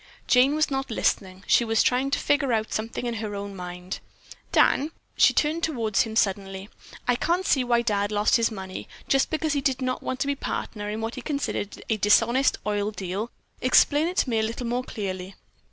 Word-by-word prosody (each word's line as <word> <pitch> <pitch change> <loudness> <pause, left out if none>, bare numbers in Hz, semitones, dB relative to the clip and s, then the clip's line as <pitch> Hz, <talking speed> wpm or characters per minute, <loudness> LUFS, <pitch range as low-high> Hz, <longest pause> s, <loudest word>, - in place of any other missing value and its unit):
Jane 260 +3 +4
was 310 -1 +1
not 270 0 -2
listening. 190 -4 -1
She - - +4
was 225 -1 +2
trying 255 +2 +2
to 280 - +1
figure 285 -3 +1
out 220 -1 -1
something 225 +3 -3
in 240 - -1
her 210 -2 -4
own 200 0 -6
mind. 180 0 -6 0.5
"Dan." 290 +3 +4 0.3
She - - +6
turned 315 +2 +1
toward 230 -11 -2
him 220 -1 +2
suddenly. 195 -1 -1 0.4
"I 245 - +4
can't 345 +8 0
see 265 -8 +3
why 240 -1 +2
Dad 205 -3 0
lost 210 +3 +3
his 230 -1 +2
money, 190 -4 -7 0.2
just 270 0 +3
because 315 -1 0
he 285 - 0
did 265 -2 0
not 255 -1 -2
want 260 - -4
to - - +2
be 280 - +1
a - - -8
partner 210 -5 -4
in 215 +1 -3
what 225 +1 -3
he 255 - -6
considered 280 -7 -3
a 220 - +1
dishonest 235 +6 +3
oil 205 0 0
deal. 200 +2 -4 0.3
Explain 290 +4 +4
it 360 +2 -4
to - - +2
me 225 - +2
a - - +2
little 230 +3 -3
more 245 +2 -1
clearly." 190 -4 -5
230 Hz, 210 wpm, -25 LUFS, 205-270 Hz, 0.5 s, She